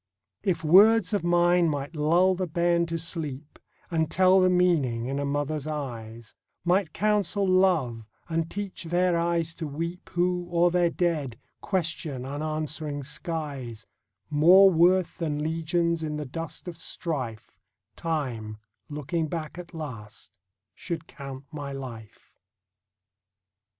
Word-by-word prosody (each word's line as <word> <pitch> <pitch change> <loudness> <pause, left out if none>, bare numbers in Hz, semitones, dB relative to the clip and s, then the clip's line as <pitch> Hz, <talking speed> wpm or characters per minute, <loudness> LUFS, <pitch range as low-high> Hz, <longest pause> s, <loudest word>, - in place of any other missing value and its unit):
If 185 -5 -1
words 210 +8 +6
of 205 - +1
mine 175 0 +4
might 145 +1 -4
lull 170 +5 +3
the 185 0 -2
bairn 170 +1 +1
to 165 0 -2
sleep, 155 -3 -4 0.3
And 160 -2 +1
tell 185 +2 +5
the 185 0 +4
meaning 160 -11 +2
in 135 +2 -2
a 140 - -1
mother's 145 +1 -2
eyes; 115 -6 -6 0.3
Might 180 -1 +2
counsel 205 -1 +1
love, 165 - +2 0.2
and 165 -1 -1
teach 200 -3 -5
their 175 +1 +2
eyes 170 -1 0
to 160 - -5
weep 170 +5 -5
Who, 175 0 0
o'er 175 0 +3
their 175 -1 +3
dead, 155 -9 -1 0.2
question 160 -8 -2
unanswering 150 0 -3
skies, 145 -6 -4 0.4
More 180 +6 +7
worth 180 +2 +3
than 150 -3 -1
legions 165 +1 0
in 150 -1 -3
the 150 - -4
dust 165 +6 -7
of 170 -2 -6
strife, 130 - -4 0.4
Time, 125 -10 -3 0.3
looking 150 +2 -2
back 160 +1 -5
at 175 - -9
last, 125 - -8 0.4
should 165 - -5
count 135 -3 -9
my 145 -3 -6
life. 125 -6 -9
160 Hz, 130 wpm, -27 LUFS, 145-175 Hz, 0.4 s, More